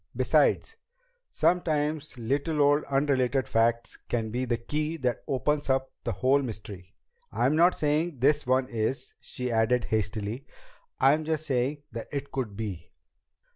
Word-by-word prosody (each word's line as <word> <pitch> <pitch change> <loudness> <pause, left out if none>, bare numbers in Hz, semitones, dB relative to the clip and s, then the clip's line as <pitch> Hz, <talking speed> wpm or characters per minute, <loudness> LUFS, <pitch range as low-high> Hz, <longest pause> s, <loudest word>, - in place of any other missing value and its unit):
Besides, - - +2 0.5
sometimes 155 -4 0
little 140 +7 -1
odd, 145 +1 +2
unrelated 135 -3 +1
facts 115 +1 +1
can 115 -2 -3
be 125 +3 -1
the 120 -1 0
key 150 +6 -3
that 125 -5 -2
opens 145 +2 0
up 130 0 +1
the 120 - -1
whole 130 +7 +2
mystery. 100 -6 -8 0.4
I'm 135 +5 +1
not 175 +3 +4
saying 150 +1 0
this 145 +2 +2
one 130 0 +2
is," 115 +2 -3
she 125 -1 -5
added 115 +2 +2
hastily, 110 +3 -2 0.5
"I'm 145 +4 +4
just 155 0 -2
saying 135 +2 -1
that 115 -1 -6
it 140 -1 -4
could 125 -7 -3
be." 95 -6 -5
130 Hz, 140 wpm, -27 LUFS, 115-145 Hz, 0.5 s, not